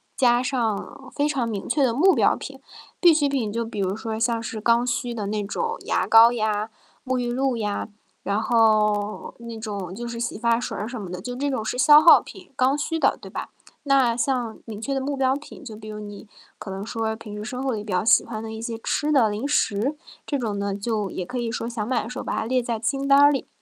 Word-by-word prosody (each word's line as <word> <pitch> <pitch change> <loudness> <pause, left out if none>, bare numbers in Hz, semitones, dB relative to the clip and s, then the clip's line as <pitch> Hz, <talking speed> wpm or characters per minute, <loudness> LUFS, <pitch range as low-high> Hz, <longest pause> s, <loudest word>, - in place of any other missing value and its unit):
加 245 -1 +3
上 235 -6 -3
非 290 +1 +1
常 255 -6 -1
明 200 -3 -4
确 280 +3 +2
的 245 - +3
目 360 +11 +4
标 - - +3
品。 - - -9 0.4
必 345 -4 +6
需 290 -2 +2
品 250 -7 -1
就 230 +1 -2
比 220 -2 -6
如 190 +1 0
说 220 0 -4
像 230 -1 +1
是 220 -1 -5
刚 235 +2 +3
需 245 0 -2
的 220 -3 -4
那 210 +1 -2
种 460 - -3
牙 - - +1
膏 225 +1 +7
呀、 215 -2 -1 0.3
沐 260 -1 -1
浴 240 -1 -1
露 260 -1 0
呀， 210 -1 -2 0.3
然 200 +1 -1
后 215 -3 +2
那 235 -1 -8
种 200 -4 -5
就 240 0 -5
是 235 0 -5
洗 235 - -3
发 235 +1 +2
水 - - -4
儿 210 - -3
什 240 -3 -6
么 185 - -7
的， 180 0 -6
就 245 +4 -6
这 285 +2 -1
种 225 -5 -2
是 250 - -3
消 295 +1 +8
耗 330 - +8
品， 365 -5 -13
刚 260 +3 +2
需 325 +2 -2
的， - - +2
对 - - -11
吧？ - - -6 0.3
那 270 -5 +3
像 245 -2 -1
明 215 -2 -7
确 275 +4 -3
的 270 - -1
目 280 +1 -3
标 265 0 +2
品， 295 +1 -10
就 225 -5 -8
比 215 0 -11
如 210 0 -6
你 205 0 -9 0.3
可 195 - -8
能 195 +2 -5
说 225 -1 -2
平 215 -2 -9
时 210 - -6
生 250 +3 -5
活 265 -3 0
里 210 -1 -4
比 210 - -7
较 180 +2 0
喜 - - +6
欢 220 -1 -6
的 220 - -6
一 220 - -7
些 230 -1 -4
吃 295 +6 -1
的 260 -7 +5
零 215 +6 -3
食， 270 0 0 0.3
这 285 - -2
种 215 -5 -3
呢 200 -1 -2
就 205 -1 -2
也 185 - -5
可 250 +6 -4
以 235 -1 -2
说 230 - -3
想 235 -3 -4
买 255 -2 0
的 - - -7
时 255 - -6
候 - - -5
把 - - -3
它 220 - -1
列 255 +2 +1
在 235 -1 -2
清 275 +4 -1
单 275 0 +6
儿 290 0 +7
里。 275 - -2
230 Hz, 275 characters per minute, -24 LUFS, 215-260 Hz, 0.4 s, 消